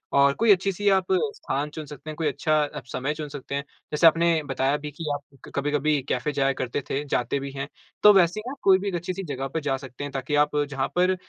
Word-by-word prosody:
और 140 0 +5
कोई 230 -2 +4
अच्छी 195 0 +3
सी 205 +3 -3
आप 190 -2 +3 0.3
स्थान 145 +3 -2
चुन 155 0 -7
सकते 150 +2 -10
हैं, 155 - -5
कोई 160 - 0
अच्छा 150 0 +1 0.2
समय 135 +4 -1
चुन 155 -1 -6
सकते 140 0 -6
हैं। 140 - -2 0.3
जैसे 150 +2 +5
आपने 165 0 +4
बताया 135 +1 0
भी 150 0 -7
की 155 +3 -7
आप 140 -2 -9
कभी-कभी 145 +1 +1
कैफ़े 130 +4 0
जाया 135 0 +2
करते 130 +2 -3
थे, 140 +2 -1
जाते 140 0 0
भी 140 0 -6
हैं। 140 0 -5 0.4
तो 210 - +10
वैसे 180 +1 +4
ही 215 - -7
ना - - -3
आप - - -11
कोई 190 -1 +6
भी 200 - -4
एक 185 - -1
अच्छी 175 +2 -3
सी 195 +1 -5
जगह 135 -4 -4
पे 160 - -1
जा 135 -2 0
सकते 130 +1 -9
हैं 145 - -5
ताकि 135 +2 -2
आप 150 - -4 0.2
जहाँ 135 -2 -1
पर 185 +1 +3
150 Hz, 255 wpm, -25 LUFS, 140-170 Hz, 0.4 s, तो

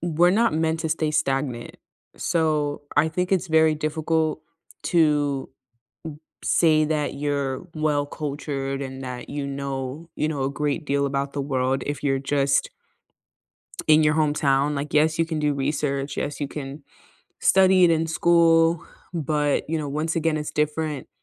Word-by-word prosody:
we're 175 +1 +3
not 225 0 +2
meant 160 0 0
to 160 - -2
stay 155 -1 0
stagnant, 135 -5 -1 0.4
so 155 -4 0 0.2
I 150 +2 +4
think 180 +3 -2
it's 190 -1 +1
very 160 -1 +4
difficult 155 +1 -1 0.5
to 145 -5 +2
m - - -37 0.9
say 155 -2 +4
that 150 -1 0
you're 140 -2 0 0.3
well 145 -1 +1 0.2
cultured 140 -2 -3
and 130 - -9
that, 125 -1 -6
you 145 - -2 0.2
know 140 -1 -3 0.4
you - - +2
know, 140 -3 -3
a 135 - 0
great 150 +2 0
deal 140 0 +2
about 140 0 -2
the 140 - -1
world 130 +1 +1
if 145 - -8
you're 135 -1 0
just 140 0 +3 1.3
in 155 0 +6
your 150 0 +3
hometown, 145 -2 +2
like, 145 +2 -4
yes, 155 +1 +3
you 165 - +3
can 160 -2 -3
do 150 -1 +1
research, 140 0 -2
yes, 145 - -3
you 145 - -2
can 140 0 -7 0.6
study 190 -1 +5
it 175 - +6
in 165 0 +1
school, 165 0 +3 0.3
but, 150 -3 0
you 165 - 0
know, 150 -2 -3
once 155 +4 -2
again, 165 -1 +1
it's 150 0 -4
different 150 -2 -2
150 Hz, 160 wpm, -24 LUFS, 140-160 Hz, 1.3 s, in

